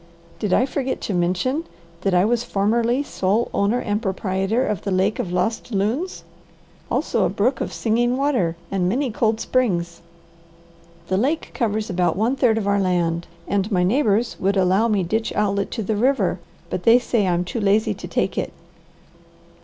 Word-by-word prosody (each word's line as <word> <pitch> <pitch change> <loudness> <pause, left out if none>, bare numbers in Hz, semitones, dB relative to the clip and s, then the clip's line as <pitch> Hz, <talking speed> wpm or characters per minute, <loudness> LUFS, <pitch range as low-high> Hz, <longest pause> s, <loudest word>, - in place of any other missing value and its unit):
"Did 210 - -2
I 255 - +4
forget 265 -1 -2
to 205 - -3
mention 185 - 0 0.4
that 195 -1 +1
I 180 +2 +4
was 235 +1 +1
formerly 235 +6 +1
sole 210 -2 0
owner 205 +4 +2
and 210 -3 -1
proprietor 195 +3 0
of 210 -5 -2
the 200 - -4
lake 190 +3 +1
of 175 - -2
Lost 220 +7 -1
Loons, 225 - -1 0.7
also - - 0
a - - +2
brook 235 +5 0
of - - -2
Singing 240 +2 +1
Water, 250 - +1 0.2
and 185 -2 +1
many 255 +4 0
cold 220 0 +1
springs. 175 -11 0 1.1
The 185 - 0
lake 285 +10 0
covers 215 -2 -1
about 180 -3 0
one 230 +6 +1
third 245 -4 +3
of 215 - -1
our 200 0 +2
land, 175 -3 0 0.2
and 200 +2 0
my 180 -2 +2
neighbours 225 +2 +1
would 195 +1 +1
allow 190 +4 +3
me 205 -4 +1
ditch 220 +6 -1
outlet 200 -1 0
to 225 - -4
the 215 +2 -1
river, 260 +6 +1 0.3
but - - -2
they 230 +1 +6
say 235 -4 0
I'm 175 0 +1
too 230 - -4
lazy 205 +2 +2
to - - -8
take - - -1
it." - - -4
210 Hz, 175 wpm, -22 LUFS, 190-235 Hz, 1.1 s, they